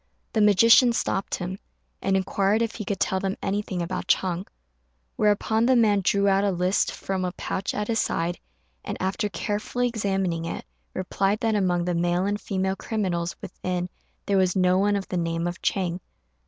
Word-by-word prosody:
The 220 - +2
magician 230 +4 +6
stopped 195 -3 -1
him, 185 +2 -5 0.4
and 195 0 +2
inquired 200 +3 +1
if 225 - -2
he 215 - -5
could 200 0 -2
tell 190 - +1
them 195 0 -2
anything 195 -3 -2
about 180 +2 -4
Ch'êng; 185 0 +1 0.7
whereupon 220 +2 +2
the 260 - +5
man 210 -4 +4
drew 200 +2 +2
out 195 0 +3
a 205 - +2
list 180 +1 +1
from 190 -1 -3
a 180 - -1
pouch 190 - -3
at 210 0 -2
his 225 -2 +1
side, 170 +1 -1 0.4
and, - - -4
after 195 +3 -1
carefully 210 +6 -1
examining 195 -7 -1
it, 165 - -5 0.3
replied 195 +2 0
that 225 -2 +1
among 180 -4 +1
the 180 - 0
male 175 +2 +1
and 205 +1 -1
female 190 0 -1
criminals 185 -5 -2
within 180 0 -3 0.4
there 200 -1 +2
was 185 -1 +2
no 185 0 +3
one 205 +1 +2
of 195 -1 -3
the 180 - -2
name 165 0 -1
of 175 0 -4
Chang. 180 -4 0
195 Hz, 180 wpm, -25 LUFS, 180-205 Hz, 0.7 s, magician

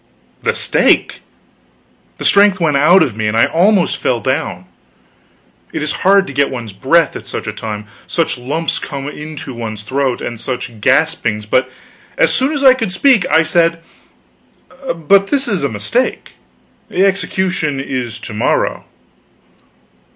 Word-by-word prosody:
The - - 0
stake! - - +1 1.0
The - - -6
strength 200 -1 +5
went 155 -4 +1
out 170 +7 +5
of 120 - -3
me, 110 -1 -2
and 110 +1 0
I 115 - +5
almost 185 +2 +2
fell 120 - 0
down. 130 - -2 1.1
It - - -3
is 150 - -1
hard 195 +1 +4
to 140 - -8
get 140 0 +2
one's 120 -5 -6
breath 155 - +2
at - - -8
such - - -5
a - - -4
time, 105 -1 -6 0.2
such 165 -2 -1
lumps 145 +7 -3
come 140 -1 -6
into 150 -2 -7
one's 110 -3 -6
throat, 130 +2 -1
and 120 -2 -5
such 120 -3 -5
gaspings; 115 -7 +1
but 130 +5 +1 0.5
as - - +3
soon 265 +3 +1
as 290 -2 -2
I 260 -1 +8
could 225 -7 -3
speak, 230 0 +3
I 160 +2 +4
said: 170 0 +2 1.1
"But 195 +5 +3
this 275 +3 0
is 195 -9 -1
a 140 - +1
mistake 105 -3 -2 0.6
the 190 +2 +2
execution 185 -6 -1
is 125 -4 -4
to - - -7
morrow." 105 - 0
150 Hz, 155 wpm, -16 LUFS, 120-185 Hz, 1.1 s, I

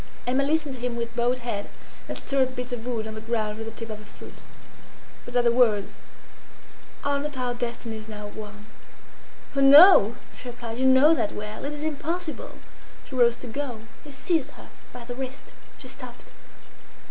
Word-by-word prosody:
Emma 260 +3 +2
listened 300 0 0
to 255 - -9
him 245 -1 -2
with 235 0 -4
bowed 240 +1 +1
head, 235 -5 -4 0.4
and - - -3
stirred 270 -2 +1
the 255 - -10
bits 250 0 -5
of 240 0 -5
wood 230 -3 -2
on 220 - -6
the 220 - -7
ground 220 -1 -2
with 225 - -5
the - - -5
tip 225 0 -7
of 210 - -6
her - - -12
foot. 210 - -13 0.9
But 245 - -9
at 245 - +4
the 235 - +4
words, 225 -5 +2 1.1
"Are 285 0 +1
not 290 -1 -4
our 250 -1 -1
destinies 235 -2 -5
now 210 -1 -7
one?" 210 0 -10 0.9
"Oh, 275 - +2
no!" 275 - +9 0.2
she 250 - -10
replied. 235 -1 -7
"You 260 - +3
know 260 +5 +7
that 210 - 0
well. 210 +3 -6
It 290 - -3
is 295 0 -5
impossible!" 315 +2 -4 0.5
She - - -12
rose 240 -2 +4
to 250 - -10
go. 245 -2 -4 0.2
He 295 - -12
seized 290 +1 -1
her - - -13 0.2
by 245 -1 -10
the 245 - -5
wrist. 260 +1 -7 0.2
She - - -11
stopped. - - -11
245 Hz, 195 wpm, -26 LUFS, 225-275 Hz, 1.1 s, no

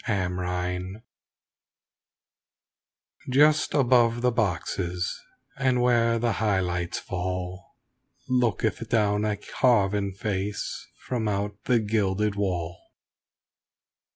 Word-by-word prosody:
AT 100 -5 0
THE 90 - -4
PLAY 90 +1 -3 2.3
Just 150 +4 +4
above 120 -3 +3
the 125 - +4
boxes 90 -4 -1 0.4
and 130 -2 +2
where 120 -1 +3
the 120 0 +1
high 105 -3 +2
lights 90 -1 -2
fall 90 0 -5 0.5
Looketh 115 -2 0
down 105 -2 +2
a 105 -1 0
carven 105 -4 +1
face 100 +1 -3 0.2
from 120 -4 -1
out 100 0 -3
the 125 - +3
gilded 105 -1 0
wall. 90 -4 -2
105 Hz, 95 wpm, -26 LUFS, 95-115 Hz, 2.3 s, Just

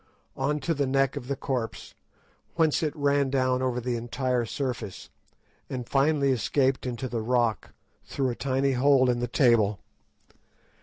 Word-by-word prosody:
_ - - -37 0.3
on 145 +3 -1
to 165 +4 -1
the 140 -3 -1
neck 135 0 +1
of 125 - -6
the 140 - -1
corpse, 130 -4 -4 0.6
whence 160 -3 +2
it 155 -3 -1
ran 140 -1 +1
down 130 -1 +1
over 125 -1 0
the 125 0 -2
entire 120 +1 -1
surface, 120 -5 -5 0.6
and 125 -2 -5
finally 140 +1 +2
escaped 130 +2 +1
into 125 +1 -4
the 115 -2 -3
rock 115 -3 0 0.3
through 135 -2 -2
a - - -5
tiny 135 +1 0
hole 130 0 +4
in 120 - -2
the 120 - -1
table. 115 -5 +3
130 Hz, 160 wpm, -27 LUFS, 120-140 Hz, 0.6 s, hole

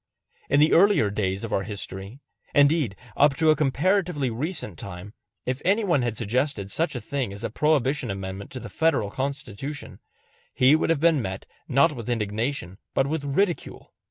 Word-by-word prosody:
In 140 - +4
the 155 +2 +5
earlier 180 - +5
days 100 -1 -1
of 115 - -4
our - - +2
history 100 +3 -7 0.4
indeed 145 - +4 0.2
up 145 -1 +4
to 160 +1 +4
a - - +4
comparatively 155 -1 +1
recent 125 - -4
time 100 +2 -8 0.3
if 130 +2 -2
any 205 +5 +2
one 175 -9 +2
had 120 -3 -2
suggested 115 -2 -1
such 165 - 0
a - - -2
thing 135 -7 -3
as 100 +3 -8
a 115 - -3
Prohibition 140 -2 +1
amendment 95 0 -5
to 130 - -5
the - - -8
Federal 160 -11 +1
Constitution, 140 0 -5 0.6
he 130 +4 +6
would 160 - 0
have 165 -3 +2
been 165 -4 +4
met 95 -2 -5 0.2
not 140 +4 +4
with 120 -5 -7
indignation 110 -3 -2 0.2
but 135 - +3
with 150 +1 -2
ridicule. 170 +6 -1
135 Hz, 175 wpm, -25 LUFS, 105-150 Hz, 0.6 s, he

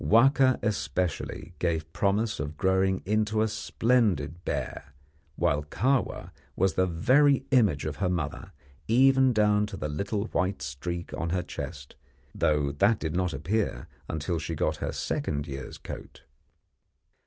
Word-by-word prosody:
Wahka, 130 +3 +5
especially, 90 -5 -2
gave 80 -2 -1
promise 105 +3 +1
of 75 +1 -4
growing 95 +1 +2
into 110 +2 +1
a - - +2
splendid 105 - 0
bear, 70 -4 -4 0.4
while 80 -4 +1
Kahwa 125 - -1 0.2
was 95 +1 +2
the 95 - +2
very 130 - +3
image 105 - +3
of 75 -2 -3
her 90 - 0
mother, 80 -5 -3 0.4
even 130 +2 +5
down 105 -2 +3
to 100 - -7
the - - -3
little 100 +7 -2
white 95 +1 -1
streak 85 +7 -5
on 85 - -2
her 90 +1 0
chest, 70 -5 -7 0.4
though 75 -2 +1
that 100 +10 +3
did 80 -3 -3
not 90 -1 +1
appear 90 +10 -2 0.2
until 80 +2 -2
she - - -4
got - - 0
her - - -3
second 70 0 -2
year's 70 -2 -7
coat. - - -9
95 Hz, 140 wpm, -28 LUFS, 80-110 Hz, 0.4 s, Wahka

